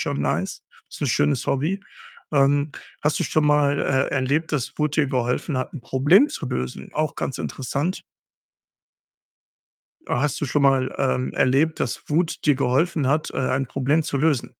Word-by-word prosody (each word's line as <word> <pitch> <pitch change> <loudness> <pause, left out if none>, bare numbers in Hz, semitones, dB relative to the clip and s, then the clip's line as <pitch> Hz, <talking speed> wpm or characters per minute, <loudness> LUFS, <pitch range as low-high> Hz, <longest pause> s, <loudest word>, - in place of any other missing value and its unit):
schon - - -2
nice. 70 -1 -2 0.3
Ist - - -9
'n - - +1
schönes 75 0 +1
Hobby. 155 +9 0 0.5
Ähm, 145 +1 +3 0.3
hast 150 +1 +1
du - - +1
schon 155 - +1
mal, 145 -1 +3
äh, 135 0 +1
erlebt, 140 +5 0
dass 135 -5 -1
Wut 150 -1 0
dir 150 -3 +3
geholfen 130 +2 -1
hat, 130 - -4
'n 150 - -6
Problem 155 - +4
zu 160 - -5
lösen? 65 - -4
Auch 155 -1 -1
ganz 135 - -3
interessant. 140 +7 -3 2.0
Hast 135 +2 0
du - - 0
schon 145 +2 0
mal, 135 -2 +3
ähm, 65 0 0
erlebt, 145 +5 +2
dass - - -2
Wut 165 +2 0
dir 145 -3 +4
geholfen 140 +3 +1
hat, 150 +3 +1
äh, - - -5
ein 130 0 0
Problem 140 +5 +1
zu 140 - -2
lösen? 150 -3 +1
140 Hz, 170 wpm, -23 LUFS, 130-150 Hz, 2.0 s, Problem